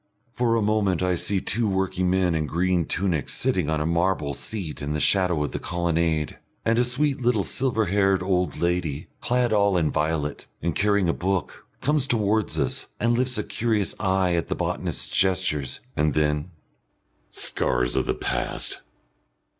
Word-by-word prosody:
For 120 -2 +1
a 115 - +1
moment 100 -4 +1
I 90 0 +2
see 95 +3 0
two 110 +3 0
working 95 -1 0
men 90 -1 +2
in 80 -2 -1
green 90 +1 +1
tunics 85 -6 -1
sitting 85 -5 0
on 80 -1 0
a 75 - -1
marble 85 -3 0
seat 85 -1 -4
in 70 +1 -2
the 75 - -1
shadow 90 -3 +3
of 75 - -3
the - - -4
colonnade, 85 -3 -1 0.3
and 115 +1 +3
a - - +5
sweet 130 +3 0
little 120 -4 +2
silver 120 -2 +1
haired 95 0 +2
old 90 -4 0
lady, 85 -4 -1
clad 125 -2 +1
all 100 -2 +3
in 80 -3 +1
violet, 75 -1 -2
and 85 - -1
carrying 100 +1 +2
a 85 - +2
book, 95 -2 -3
comes 145 -1 +1
towards 110 -6 +1
us, 70 -4 -1
and 120 +2 +2
lifts 130 +1 +1
a - - -1
curious 110 -4 0
eye 95 -2 +1
at 85 -1 0
the - - -2
botanist's - - -1
gestures. 90 -8 +1
And 75 -1 +1
then 75 +1 +1 0.8
"Scars - - 0
of - - 0
the - - 0
past! - - -2
90 Hz, 170 wpm, -24 LUFS, 80-105 Hz, 0.8 s, a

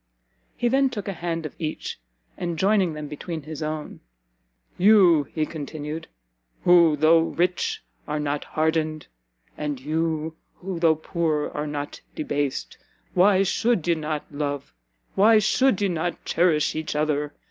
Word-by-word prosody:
He 240 - +1
then 270 +2 +3
took 215 -5 -6
a 200 - -2
hand 165 -2 -3
of 155 - -6
each, 155 - -4 0.4
and 170 -2 -3
joining 190 -2 +2
them 150 -1 -6
between 155 +2 -6
his 155 +1 -7
own, 155 0 -4 0.8
"You," 180 -6 +6
he 155 +2 -2
continued, 155 +1 -6 0.6
"who, 170 -3 +6
though 160 +2 +6
rich, 175 +2 -1 0.2
are 150 0 -2
not 145 0 -2
hardened, 155 0 -1 0.5
and 145 -3 -3
you, 160 +2 -2 0.2
who 185 -2 -5
though 165 -2 +4
poor, 155 -1 -1
are 150 +1 -3
not 145 -1 -5
debased, 145 -3 -2 0.3
why 190 +1 +5
should 195 -2 +1
ye 170 - +4
not 155 -2 -3
love, 145 - -4 0.4
why 220 +3 +6
should 230 +2 +3
ye - - +3
not 175 -1 -3
cherish 165 -3 +2
each 155 -1 -4
other? 150 -1 0
160 Hz, 145 wpm, -24 LUFS, 150-175 Hz, 0.8 s, You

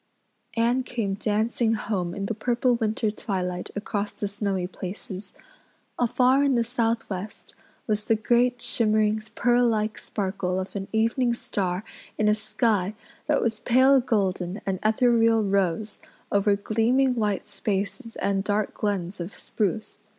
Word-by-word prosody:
Anne 240 +3 +3
came 230 -6 -2
dancing 220 +3 +1
home 190 -5 -2
in 200 -1 -3
the 225 - -1
purple 240 +3 +1
winter 220 -2 0
twilight 180 -4 -3
across 205 0 -2
the 205 - -4
snowy 200 -2 -2
places. 190 +1 -6 0.7
Afar 255 +3 +4
in 275 -2 +3
the 235 - +3
southwest 225 -4 -3 0.3
was 210 -2 0
the 225 - +3
great 240 +3 +2
shimmering, 215 -1 +2
pearl 245 0 +3
like 215 -1 0
sparkle 190 -2 -2
of 190 +2 -6
an 195 -1 -3
evening 235 +2 +2
star 185 -4 -1 0.3
in 215 - +2
a 210 - +5
sky 215 -2 0 0.3
that 300 -1 +2
was 225 -2 -1
pale 260 +3 +5
golden 195 -5 0
and 190 -2 -1
ethereal 225 0 +4
rose 200 +1 0 0.3
over 200 0 +3
gleaming 230 +6 +2
white 210 -4 -1
spaces 205 +1 -3
and 195 -1 0
dark 210 0 0
glens 200 -3 -2
of 175 +4 -6
spruce. 215 +1 -2
215 Hz, 140 wpm, -26 LUFS, 200-230 Hz, 0.7 s, a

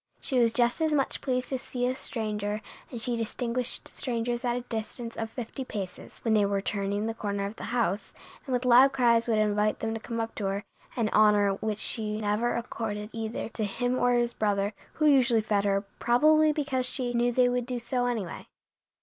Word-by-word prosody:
She 260 - 0
was 230 -1 +4
just 240 +4 +2
as 315 -1 +2
much 280 -3 +1
pleased 255 -2 -1
to 265 - -2
see 245 -1 -3
a 255 +1 0
stranger, 210 -4 -2 0.3
and 240 - -6
she 240 +1 +1
distinguished 235 +2 -1
strangers 240 0 -2
at 240 -1 0
a 245 - -2
distance 230 0 -5
of 225 0 -3
fifty 245 +3 -6
paces, 195 -7 -7
when 225 - +2
they 210 -1 +4
were 200 0 +1
turning 200 +1 -2
the 225 - -2
corner 200 -3 -3
of 200 +2 -5
the - - -7
house, 225 -4 -1 0.3
and 260 - -2
with 250 0 0
loud 255 +2 +7
cries 235 -3 +3
would 225 -2 +2
invite 210 0 +2
them 225 0 -2
to 225 - -4
come 230 +1 -5
up 225 0 -3
to 205 - -4
her, 195 +1 -1 0.3
an 230 -3 +1
honor 210 -2 +4
which 210 +2 -2
she 215 0 0
never 215 +3 0
accorded 225 -2 -4
either 225 0 -4
to 225 - -3
him 245 +5 -1
or 245 0 +3
his 240 0 +1
brother, 205 -1 0 0.2
who 305 - 0
usually 255 -6 +5
fed 205 -1 0
her, 195 -1 +2 0.2
probably 305 +6 +4
because 275 -4 -1
she 250 -2 -1
knew 240 0 +2
they 250 +1 +4
would 245 -1 -1
do 250 -1 -2
so 245 +1 -1
anyway. 220 -7 -4
230 Hz, 210 wpm, -28 LUFS, 210-245 Hz, 0.3 s, loud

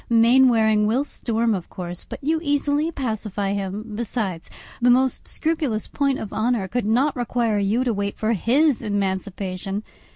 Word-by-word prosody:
Mainwaring 230 -2 +5
will 245 +6 +2
storm 230 -5 -1
of 185 -4 -4
course, 175 -1 -7
but - - -9
you 315 +3 +1
easily 290 +1 +1
pacify 215 - -2
him; 200 +3 -4
besides, 210 -6 -3 0.3
the 245 - +4
most 255 +1 +2
scrupulous 305 -9 -1
point 275 -2 0
of 210 - -6
honour 220 -3 0
could 240 +2 -2
not 260 +6 +2
require 235 -3 0
you 210 +5 +1
to 245 -3 0
wait 200 0 -3
for 220 +1 +1
his 260 - +2
emancipation. 195 -1 -3
225 Hz, 155 wpm, -23 LUFS, 200-255 Hz, 0.3 s, Mainwaring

